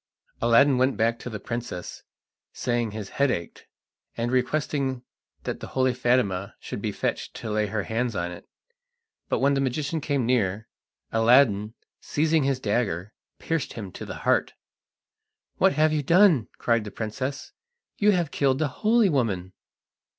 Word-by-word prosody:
Aladdin 125 +3 +5
went 130 -3 +2
back 115 +2 +1
to 125 - -6
the 110 -2 -6
princess, 115 -5 -5 0.5
saying 120 -2 -1
his 105 -2 -6
head 140 0 +1
ached, 85 -8 -4 0.5
and 120 +1 -1
requesting 130 0 0 0.4
that - - -4
the - - -7
holy 130 -1 +3
Fatima 100 -7 0
should - - -6
be - - -1
fetched - - -3
to 110 - -5
lay 105 0 +1
her 105 0 -2
hands 115 +1 -2
on 85 -1 -2
it. 85 - -11 0.8
But - - +1
when 140 +1 +3
the 135 - +1
magician 140 +4 -1
came 140 -4 0
near, 110 -3 0 0.4
Aladdin, 115 -2 +4 0.2
seizing 155 -1 +1
his 135 -2 +1
dagger, 105 -4 -1 0.2
pierced 165 -4 -2
him 100 -5 -7
to - - -8
the - - -6
heart. - - +2 1.0
"What 190 0 +4
have 155 0 +3
you 150 - +1
done?" 165 - +5
cried 115 -2 +1
the 105 - -6
princess. 130 +6 -4 0.5
"You 210 - +4
have 175 -7 +2
killed 135 -2 +2
the 150 0 0
holy 225 0 +4
woman!" 100 - -1
125 Hz, 160 wpm, -25 LUFS, 110-140 Hz, 1.0 s, Aladdin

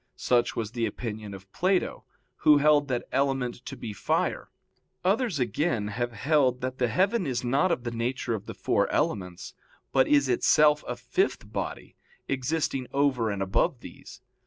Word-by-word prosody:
Such 120 -1 +1
was 110 -2 -3
the 120 -2 -1
opinion 105 -3 -6
of 95 0 -14
Plato, 185 - 0 0.3
who 150 -1 +6
held 145 0 +4
that 125 -3 -2
element 135 -3 -1
to 135 - -6
be 110 -3 -6
fire. 95 - -1 0.6
Others, 205 - +1
again, 120 - 0
have 120 +3 -2
held 130 +1 +2
that 130 +1 -4
the 125 - +2
heaven 185 - +1
is 125 -2 -2
not 140 +9 +2
of 125 - -1
the 120 - -3
nature 120 +1 -2
of 110 - -5
the - - -7
four - - +1
elements, 90 -2 -2 0.4
but 135 -1 +3
is 140 -2 +4
itself 150 +4 +4
a 125 - -3
fifth 370 - -1
body, - - -5 0.3
existing 135 -1 -1
over 135 -5 +1
and 100 -1 -2
above 95 0 0
these. - - -12
125 Hz, 165 wpm, -27 LUFS, 115-145 Hz, 0.6 s, who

